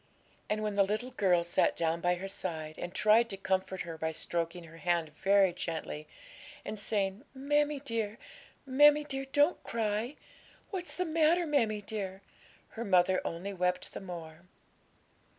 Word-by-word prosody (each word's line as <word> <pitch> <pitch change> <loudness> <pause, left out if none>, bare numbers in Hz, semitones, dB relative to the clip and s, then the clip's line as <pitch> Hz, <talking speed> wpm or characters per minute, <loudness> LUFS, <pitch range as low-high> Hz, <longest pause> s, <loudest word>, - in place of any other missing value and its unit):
And 215 0 0
when 210 -1 -1
the 200 - +3
little 215 +6 0
girl 185 -7 +3
sat 170 - +2
down 165 0 0
by 175 +1 +2
her 190 +2 -5
side, 160 -5 -5
and 175 - -4
tried 220 +4 +4
to 195 - -4
comfort 190 0 -1
her 165 -2 -6
by 160 0 -1
stroking 170 +2 -2
her 165 0 -13
hand 170 -2 0
very 195 +4 +3
gently, 160 -3 -4 0.6
and 210 0 -5
saying, 200 +1 -1
'Mammie 290 +1 +1
dear, 230 -5 -2 0.5
mammie 295 +3 +6
dear, 270 -2 -3
don't 290 +5 +2
cry! 225 +3 -1 0.6
What's 365 -3 -4
the 365 - -1
matter, 330 +2 +3
mammie 225 -9 +1
dear?' 195 -2 -5 0.5
her 230 - -5
mother 185 -2 +3
only 180 +4 -4
wept 180 -1 -1
the - - -6
more. 165 -4 -8
200 Hz, 155 wpm, -31 LUFS, 175-245 Hz, 0.6 s, mammie